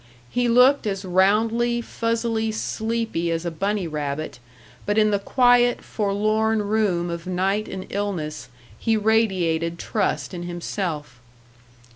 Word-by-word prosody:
He 245 0 +1
looked 250 +2 +5
as 195 -1 -3
roundly, 220 +6 +2
fuzzily 230 -1 -1
sleepy 220 -5 -2
as 165 +1 -2
a 170 - -1
bunny 195 +2 -1
rabbit, 150 -3 -4 0.4
but 205 +1 -1
in 215 -1 +4
the 200 - +1
quiet, 245 +3 +3
forlorn 215 +1 0
room 200 -5 0
of 170 +1 -6
night 190 +3 0
and 185 -1 -6
illness 190 -7 -3 0.3
he 225 -1 +1
radiated 185 -7 +1
trust 200 +1 -2
in 175 - -5
himself. 175 - -4
205 Hz, 125 wpm, -23 LUFS, 175-225 Hz, 0.4 s, looked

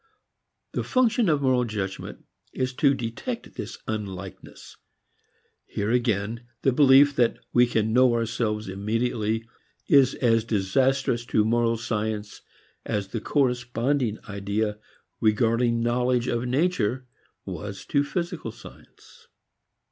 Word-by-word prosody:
The - - -2
function 240 -5 +2
of 145 -3 +1
moral 130 -2 +3
judgment 105 -4 -5 0.3
is 130 0 -2
to 140 +1 +3
detect 115 -1 -5
this - - -6
unlikeness. 100 -3 -7 0.9
Here, 105 +2 -2
again, 115 -1 0 0.2
the 135 - +4
belief 140 +1 +6
that 120 -2 +3 0.2
we 125 0 +5
can 110 -2 0
know 125 -1 +5
ourselves 110 -2 -1
immediately 110 +2 -1 0.4
is 135 -2 +5
as 115 -3 +2
disastrous 120 +4 +1
to 105 -3 +2
moral 115 0 +2
science 110 -2 -3 0.4
as 105 -3 -3
the 115 +1 -4
corresponding 125 -2 0
idea 105 +1 -2 0.4
regarding 115 +1 +2
knowledge 125 +1 +1
of 120 0 -1
nature 130 - 0 0.4
was 95 +2 -6
to 140 -1 +1
physical 170 +5 -4
science. 470 0 -16
115 Hz, 115 wpm, -25 LUFS, 105-130 Hz, 0.9 s, belief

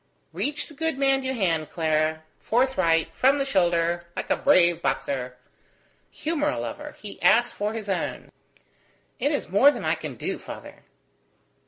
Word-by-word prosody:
"Reach 295 +1 -2
the 310 - -13
good 320 -1 -2
man 270 -1 +2
your 265 0 -2
hand, 165 -8 0
my 165 - -3
girl; 155 0 +1 0.2
forthright, 185 -10 +2
from 270 +2 +3
the 275 - 0
shoulder, 175 -6 +1
like - - -4
a - - +5
brave 175 -2 +4
boxer. 125 -5 -2 0.7
Humour 300 -1 -1
a - - -2
lover. 295 0 -6
He 205 -2 -9
asks 240 +2 +4
for 210 +1 -3
his 220 -2 -6
own." 190 -3 -3 0.9
"It 285 - +1
is 290 - -1
more 205 +10 +6
than - - -3
I - - +2
can - - -6
do, - - -4
father." - - -11
210 Hz, 165 wpm, -25 LUFS, 170-275 Hz, 0.9 s, more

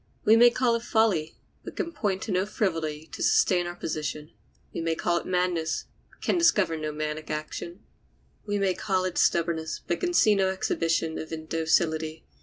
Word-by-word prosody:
We 220 - +7
may 240 +1 +8
call 240 0 +1
it 230 - 0
folly, 220 -9 +1 0.3
but - - -9
can 335 - -3
point 205 - -2
to 220 - -4
no 185 +1 +1
frivolity 165 -7 -2
to - - -7
sustain 175 -2 +3
our 175 - -6
position. 155 -2 -4 0.4
We - - -3
may 165 0 0
call 170 +1 0
it - - -10
madness, 180 -3 0 0.2
but - - -26
can 350 - +1
discover 205 - +3
no 155 -1 -3
maniac 155 +1 -4
action. 160 +4 -5 0.6
We 205 -1 -2
may 195 -2 +1
call 185 -1 -1
it 185 - -2
stubborness, 165 -2 +1
but 175 - -1
can 350 -1 -1
see 215 - +5
no 195 -2 +2
exhibition 165 -3 -1
of 155 - -7
indocility. 160 0 -1
175 Hz, 185 wpm, -27 LUFS, 160-200 Hz, 0.6 s, may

